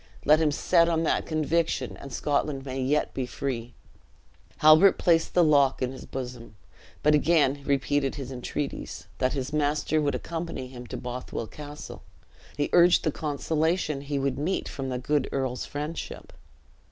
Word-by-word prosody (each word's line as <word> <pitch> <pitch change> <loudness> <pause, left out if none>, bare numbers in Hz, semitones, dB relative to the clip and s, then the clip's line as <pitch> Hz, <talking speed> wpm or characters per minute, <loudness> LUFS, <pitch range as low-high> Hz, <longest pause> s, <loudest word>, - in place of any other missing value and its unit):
Let 150 +2 +6
him 160 -2 +3
set 170 +3 +3
on 165 -1 +1
that - - 0
conviction 160 +1 0
and 140 - -10
Scotland 140 0 -1
may 130 0 -3
yet 140 +4 0
be 130 -2 -3
free." 120 -3 -4 0.8
Halbert 155 +6 +7
placed 165 -2 +2
the 175 - +6
lock 140 -4 +4
in 130 0 -1
his 130 - -9
bosom, 125 -4 -7 0.5
but 150 - +5
again 150 -2 +3
repeated 140 0 +1
his 135 -2 -6
entreaties, 135 +3 -5
that 130 - +1
his 135 0 -3
master 150 +1 +1
would 145 -1 0
accompany 165 -5 -4
him 125 -1 -10
to - - -5
Bothwell 125 -1 -5
Castle. 145 +6 -9 0.6
He 145 - -1
urged 175 0 +6
the 155 - +1
consolation 155 +1 -1
he 140 0 -3
would 135 -1 -1
meet 175 +6 -1
from 135 -1 -5
the 125 - -2
good 140 +2 0
earl's 130 -2 -2
friendship. 150 +3 -6
145 Hz, 160 wpm, -27 LUFS, 130-155 Hz, 0.8 s, Halbert